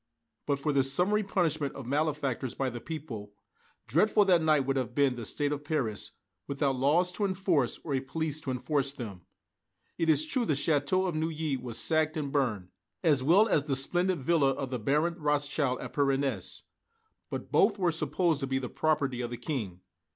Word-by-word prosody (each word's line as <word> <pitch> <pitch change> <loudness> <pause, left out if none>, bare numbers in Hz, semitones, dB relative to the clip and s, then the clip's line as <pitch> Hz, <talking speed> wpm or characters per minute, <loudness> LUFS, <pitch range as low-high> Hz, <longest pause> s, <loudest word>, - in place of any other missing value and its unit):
But 140 -1 +1
for 145 +2 -1
this 135 -1 +3
summary 195 +8 +2
punishment 165 -8 -1
of 135 - -7
malefactors 140 -3 -1
by 135 -2 -1
the 120 0 -7
people, 125 -11 -7 0.5
dreadful 205 - +3
that 180 -3 +4
night 155 -2 +3
would 135 0 -1
have 125 -2 -2
been 140 -3 +3
the 120 -2 -6
state 145 +4 -1
of 145 0 -3
Paris, 140 -9 -1 0.3
without 140 -1 0
laws 155 +8 +3
to 205 - -3
enforce 185 -9 0
or 150 - -3
a 135 - +2
police 155 +3 -2
to 145 - -6
enforce 140 +2 0
them. 105 -9 -8 0.8
It 165 - +1
is 155 0 +4
true 245 +10 0
the 185 - +1
Château 150 +6 +1
of 175 - -2
Neuilly 155 -2 -1
was 120 -3 -4
sacked 155 0 +1
and 145 -3 -3
burned, 115 -11 -1 0.3
as 150 -6 +4
well 180 +11 +5
as 150 -9 +2
the 140 -3 0
splendid 175 +4 +1
villa 155 -2 +3
of 135 -1 -5
the 125 - -2
Baron 150 +9 +1
Rothschild 145 -3 0
at - - -7
Parennes; 140 -1 0 0.7
but - - -6
both 205 +1 +4
were 180 -3 +2
supposed 160 +1 0
to 135 - -3
be 130 0 0
the 130 -2 -4
property 145 -5 0
of 120 - -3
the 120 - -5
King. 115 - -4
145 Hz, 190 wpm, -29 LUFS, 135-160 Hz, 0.8 s, well